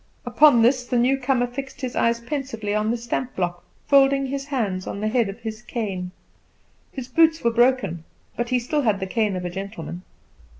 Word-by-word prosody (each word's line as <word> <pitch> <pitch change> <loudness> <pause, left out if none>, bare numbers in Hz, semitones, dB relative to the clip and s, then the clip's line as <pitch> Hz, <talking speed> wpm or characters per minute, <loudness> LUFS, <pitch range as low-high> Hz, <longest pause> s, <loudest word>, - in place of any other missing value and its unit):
Upon 245 0 +5
this 250 +2 +3
the 245 - -1
newcomer 255 0 +2
fixed 260 +3 -7
his 255 -1 -4
eyes 230 0 +2
pensively 235 -5 -4
on 215 +1 0
the 235 - 0
stamp 240 +2 -3
block, 175 -1 -2 0.2
folding 275 -1 +4
his 275 +1 -4
hands 215 -10 -2
on - - -4
the 215 - -1
head 230 -2 +1
of 195 - -8
his 220 0 -6
cane. 200 -7 -4 0.8
His 260 -3 -6
boots 320 +4 +3
were 235 - +3
broken, 235 -9 +2 0.3
but 240 0 -2
he 255 - +2
still 270 +5 -1
had 215 -6 +1
the 190 - -2
cane 210 0 0
of 180 -1 -4
a 175 - -3
gentleman. 190 -2 -6
240 Hz, 195 wpm, -23 LUFS, 205-265 Hz, 0.8 s, Upon